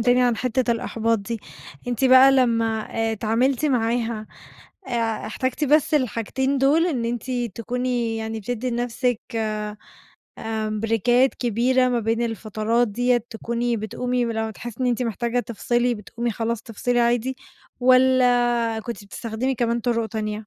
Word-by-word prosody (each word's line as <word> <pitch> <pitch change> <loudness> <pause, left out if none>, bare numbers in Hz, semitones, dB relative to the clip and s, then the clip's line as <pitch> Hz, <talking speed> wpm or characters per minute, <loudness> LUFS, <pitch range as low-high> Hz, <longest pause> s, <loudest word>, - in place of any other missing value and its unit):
تاني 245 +2 +4
عن 245 -2 +2
حِتّة 255 0 0
الإحباط 230 0 0
دي، 225 +2 -5 0.5
أنتِ 245 +2 0
بقى 260 +1 +8
لمّا 230 -4 +2
آآ 225 0 -1
اتعاملتِ 235 +7 +1
معاها، 230 -4 0 0.6
آآ 230 -3 -1
احتجتِ 260 +7 -2
بس 305 +2 +3
الحاجتين 265 +1 0
دول 295 +6 +4
إن 260 -9 -1
أنتِ 240 +2 -3 0.2
تكوني 240 0 -2
يعني 220 0 -4
بتدّي 245 +3 -3
لنَفْسِك 245 0 -1 1.2
آمم 215 -1 -3
بريكات 240 +4 +2
كبيرة 255 +2 +2
ما 245 -1 +1
بين 225 +1 0
الفترات 225 +1 0
ديّة 245 +4 +2
تكوني 235 +1 -2
بتقومي 245 +3 -2
ولما 225 -1 -2
تحسّي 240 +2 -9
إن 255 - +1
أنتِ 245 0 +1
محتاجة 235 +1 -1
تفصِلي 240 +1 0
بتقومي 235 +3 -4
خلاص 230 0 -2
تفصِلي 240 +2 -1
عادي 240 +2 +1 0.4
والّا 245 -3 +3
كنتِ 230 -2 -7
بتستخدمي 230 +5 -3
كمان 235 0 0
طُرُق 230 -1 0
تانية؟ 215 -2 -3
235 Hz, 140 wpm, -23 LUFS, 225-250 Hz, 1.2 s, بقى